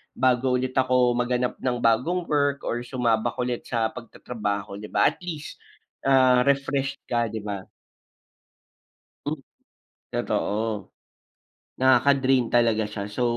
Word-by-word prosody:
bago 130 0 +2
ulit 130 0 -1
ako 125 -1 +3
maghanap 125 +1 -1
ng 125 -1 -1
bagong 130 +11 +2
work 145 -3 0
or 120 - -2
sumabak 120 -2 0
ulit 125 -1 -3
sa 115 -2 0
pagtatrabaho 105 -4 -5
'di 105 - -7
ba, - - +3
at - - -17
least, 165 -5 -7 0.5
ah, 130 -2 +5
refresh 135 0 +1
ka 120 -1 0
'di 110 -1 -6
ba? 100 -2 -5 1.6
Hmm, 150 -1 -3 0.7
totoo. 110 0 -2 0.9
Nakaka 130 +1 +5
drain 130 -2 +2
talaga 115 -2 +3
siya. 105 -2 -4
So, 105 +4 -3
125 Hz, 125 wpm, -25 LUFS, 115-130 Hz, 1.6 s, ah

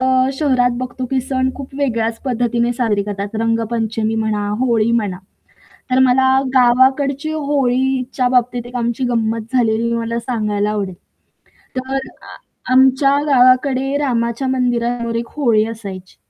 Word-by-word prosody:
अ, 260 - +1 0.3
शहरात 260 -4 +1
बघतो 255 0 -5
की 265 -1 +1
सण 260 0 -1
खूप 275 -1 -9
वेगळ्याच 230 -4 -1
पद्धतीने 240 -1 0
साजरे 225 -5 0
करतात. 205 +1 -5
रंगपंचमी 225 -1 -1
म्हणा, 215 -2 -1
होळी 230 -3 +2
म्हणा. 205 -6 -1 0.7
तर 255 - +3
मला 260 0 +4 0.3
गावाकडची 265 +4 +3
होळीच्या 265 -3 0
बाबतीत 245 -1 +1
एक 245 - -12
आमची 235 +1 -1
गंमत 230 0 -2
झालेली 235 -1 +1
मला 230 0 -2
सांगायला 210 -4 -1
आवडेल. 200 -3 -3 0.8
तर 260 +1 -4 0.3
अ, - - -11 0.4
आमच्या 265 +2 +4
गावाकडे 260 0 +3
रामाच्या 240 -2 -1
मंदिरावर 240 -2 -1
एक 235 0 -2
होळी 230 -7 +2
असायची. 195 -5 -8
245 Hz, 130 wpm, -18 LUFS, 225-260 Hz, 0.8 s, मला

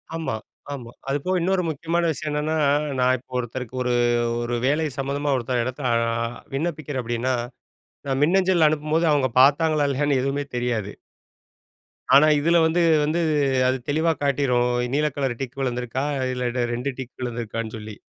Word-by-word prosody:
ஆமா, 160 -8 -2 0.4
ஆமா. 120 -4 -8 0.2
அது 140 - +1
போக 185 0 +1
இன்னொரு 185 +2 +1
முக்கியமான 165 +3 0
விஷயம் 155 0 -4
என்னன்னா, 150 +2 -1 0.4
நான் 125 0 +3
இப்போ 130 +1 -21
ஒருத்தருக்கு 125 +1 -5
ஒரு, 125 -1 0 0.5
ஒரு 120 0 -2
வேலை 150 +4 +2
சம்மந்தமா 140 +1 -1
ஒருத்தர் 125 0 -1
இடத்தில 130 +1 -3
அ - - +3 0.6
விண்ணப்பிக்கிறேன் 150 -3 -3
அப்டின்னா, 120 +2 -1 0.7
நான் 135 0 0
மின்னஞ்சல் 180 0 +4
அனுப்பும்போது 155 +2 +1
அவங்க 140 -3 +2
பாத்தாங்களா, 150 +1 +4
இல்லயான்னு 140 0 +1
எதுவுமே 140 +2 -1
தெரியாது. 115 -4 -1 1.2
ஆனா 150 +3 +7
இதில 170 +4 +3
வந்து 165 +2 +2 0.2
வந்து 160 +3 0 0.5
அது 130 +1 +1
தெளிவா 160 +3 +2
காட்டிரும். 130 -3 +2 0.3
நீல 150 +1 +2
கலர் 135 -4 -1
டிக் 135 +1 -6
விழுந்திருக்கா 125 +1 -2 0.3
இல்ல, 125 -1 -1
2 125 +4 -2
டிக் 130 -2 -7
விழுந்துருக்கான்னு 115 -2 -4
சொல்லி. 105 0 -8
135 Hz, 145 wpm, -23 LUFS, 125-155 Hz, 1.2 s, ஆனா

